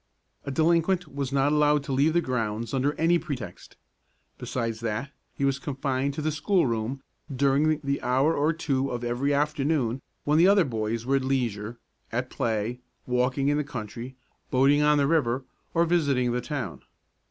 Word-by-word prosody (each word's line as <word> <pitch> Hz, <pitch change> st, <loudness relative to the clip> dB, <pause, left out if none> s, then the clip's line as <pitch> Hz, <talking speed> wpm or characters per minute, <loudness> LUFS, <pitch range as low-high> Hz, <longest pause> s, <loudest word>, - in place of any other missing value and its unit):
A -, -, -4 dB
delinquent 165 Hz, +2 st, +1 dB
was 140 Hz, -2 st, -3 dB
not 140 Hz, +1 st, +2 dB
allowed 150 Hz, -1 st, +3 dB
to 140 Hz, -, -5 dB
leave 140 Hz, +4 st, +3 dB
the 175 Hz, -, +3 dB
grounds 115 Hz, -4 st, -2 dB
under 135 Hz, +2 st, +1 dB
any 170 Hz, +2 st, +3 dB
pretext. 140 Hz, -8 st, -7 dB, 0.6 s
Besides 115 Hz, -3 st, -3 dB
that, 115 Hz, +4 st, -3 dB, 0.2 s
he 140 Hz, -, 0 dB
was 135 Hz, 0 st, +1 dB
confined 135 Hz, 0 st, -2 dB
to 155 Hz, -, -3 dB
the 155 Hz, -, +1 dB
schoolroom 135 Hz, -, 0 dB, 0.3 s
during 140 Hz, +3 st, +2 dB
the 140 Hz, 0 st, -1 dB
hour 130 Hz, +5 st, +2 dB
or 150 Hz, +3 st, +2 dB
two 140 Hz, -5 st, -1 dB
of 120 Hz, -1 st, -4 dB
every 120 Hz, +4 st, 0 dB
afternoon 145 Hz, -3 st, 0 dB, 0.2 s
when 150 Hz, +2 st, +3 dB
the 175 Hz, -, +7 dB
other 195 Hz, -3 st, +5 dB
boys 115 Hz, -2 st, -2 dB
were 135 Hz, +2 st, +2 dB
at 135 Hz, -, -2 dB
leisure, 120 Hz, -4 st, -2 dB, 0.3 s
at -, -, -2 dB
play, 115 Hz, +2 st, -1 dB, 0.3 s
walking 125 Hz, +2 st, +1 dB
in 145 Hz, -, +2 dB
the 150 Hz, -, 0 dB
country, 125 Hz, -2 st, -7 dB, 0.3 s
boating 140 Hz, +3 st, +4 dB
on 150 Hz, 0 st, +4 dB
the 140 Hz, -, +3 dB
river, 135 Hz, -4 st, +1 dB, 0.3 s
or 170 Hz, +1 st, +4 dB
visiting 140 Hz, -8 st, +2 dB
the 125 Hz, +1 st, -1 dB
town. 125 Hz, -, -5 dB
135 Hz, 170 wpm, -26 LUFS, 125-150 Hz, 0.6 s, the